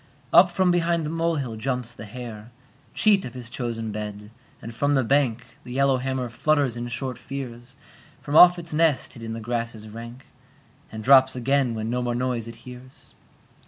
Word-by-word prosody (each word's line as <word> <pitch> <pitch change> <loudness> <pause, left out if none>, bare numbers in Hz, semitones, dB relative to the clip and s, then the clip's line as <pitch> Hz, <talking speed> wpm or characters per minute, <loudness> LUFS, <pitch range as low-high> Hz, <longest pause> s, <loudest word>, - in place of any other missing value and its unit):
Up 175 0 +8
from 180 +1 +2
behind 170 -2 +1
the 150 - -3
molehill 165 -8 -1
jumps 125 +1 -3
the 110 - -10
hare, 110 -1 -9 0.5
Cheat 205 -3 +4
of 125 - -8
his 125 -2 -9
chosen 115 -3 -4
bed, 105 0 -6 0.3
and 115 - -8
from 145 +5 +1
the 135 - +2
bank 125 -2 +1 0.2
The 125 - -9
yellowhammer 130 -1 +1
flutters 140 +1 +1
in 120 0 -4
short 125 +1 -4
fears 130 -1 -8 0.4
From 145 - -5
off 180 +2 +9
its 170 -2 -4
nest 160 -3 +1
hid 115 - -12
in 115 0 -5
the 115 - -5
grasses 115 -1 -4
rank, 115 +4 -10 0.7
And 110 0 -7
drops 130 +1 +6
again 130 -1 +1
when 110 +1 -3
no 125 +1 -1
more 120 -1 -1
noise 120 -2 -2
it 115 - -8
hears. 125 +1 -12
125 Hz, 180 wpm, -24 LUFS, 115-140 Hz, 0.7 s, off